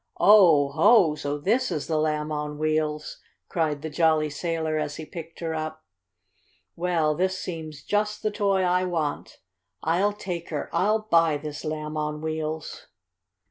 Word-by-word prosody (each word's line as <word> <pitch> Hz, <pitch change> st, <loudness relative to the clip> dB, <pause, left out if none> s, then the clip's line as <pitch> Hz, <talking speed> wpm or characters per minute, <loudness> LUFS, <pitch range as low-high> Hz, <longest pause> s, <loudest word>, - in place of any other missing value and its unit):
"Oh, 175 Hz, -9 st, +6 dB
ho! 170 Hz, +1 st, +5 dB
So 145 Hz, -1 st, -3 dB
this 225 Hz, -, +1 dB
is 145 Hz, -, -2 dB
the 155 Hz, -2 st, 0 dB
Lamb 155 Hz, 0 st, -1 dB
on 150 Hz, 0 st, -3 dB
Wheels!" 155 Hz, 0 st, -1 dB, 0.3 s
cried 155 Hz, -4 st, -1 dB
the 160 Hz, -, -3 dB
jolly 155 Hz, -1 st, +2 dB
sailor 160 Hz, 0 st, -2 dB
as 145 Hz, -1 st, -3 dB
he 160 Hz, -, -7 dB
picked 165 Hz, +1 st, -9 dB
her 165 Hz, -1 st, -2 dB
up. 155 Hz, 0 st, -5 dB, 0.9 s
"Well, 170 Hz, -3 st, +1 dB
this 185 Hz, +4 st, 0 dB
seems 160 Hz, -5 st, -6 dB
just 210 Hz, 0 st, -1 dB
the 215 Hz, -, +1 dB
toy 200 Hz, -2 st, +1 dB
I 180 Hz, 0 st, +2 dB
want. 165 Hz, -5 st, -3 dB, 0.4 s
I'll 185 Hz, +6 st, +2 dB
take 180 Hz, -5 st, -6 dB
her! 150 Hz, -3 st, -4 dB
I'll 215 Hz, +3 st, +2 dB
buy 165 Hz, -7 st, +3 dB
this 145 Hz, 0 st, -7 dB
Lamb 155 Hz, 0 st, -4 dB
on 150 Hz, 0 st, -2 dB
Wheels!" 155 Hz, 0 st, -4 dB
160 Hz, 155 wpm, -25 LUFS, 150-180 Hz, 0.9 s, Oh